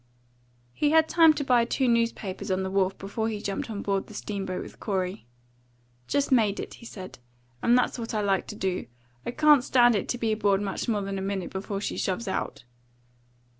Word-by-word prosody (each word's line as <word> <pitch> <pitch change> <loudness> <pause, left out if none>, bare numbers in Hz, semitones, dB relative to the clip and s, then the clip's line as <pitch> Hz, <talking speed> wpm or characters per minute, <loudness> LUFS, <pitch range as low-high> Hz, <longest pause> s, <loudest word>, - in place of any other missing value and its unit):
He 295 - +1
had 320 +1 +5
time 330 -1 +6
to 290 - -2
buy 245 -3 +4
two 255 +2 0
newspapers 230 -4 0
on 190 0 0
the 190 - -3
wharf 195 -1 +1
before 220 +3 -3
he 215 -2 -3
jumped 200 +2 -3
on 205 -2 -4
board 195 -1 -1
the 215 - -12
steam 200 -2 -4
boat 185 0 -3
with - - -12
Corey. 185 - -3 0.8
"Just 285 0 0
made 215 -6 +3
it," - - -6
he 235 - -11
said; 185 - -9 0.4
"and 240 +1 +4
that's 250 - 0
what 230 0 -4
I 215 - +1
like 195 -2 +1
to - - -7
do. 190 -3 -2 0.4
I - - 0
can't 295 +1 +5
stand 245 -2 +5
it 200 - -2
to 245 - 0
be 225 -2 0
aboard 205 -2 +2
much 200 +3 -3
more 210 -3 0
than 195 0 -3
a - - -4
minute 195 -1 -3
before 195 +1 -4
she - - -3
shoves 195 +5 -2
out." 190 -8 -3
205 Hz, 210 wpm, -27 LUFS, 195-240 Hz, 0.8 s, time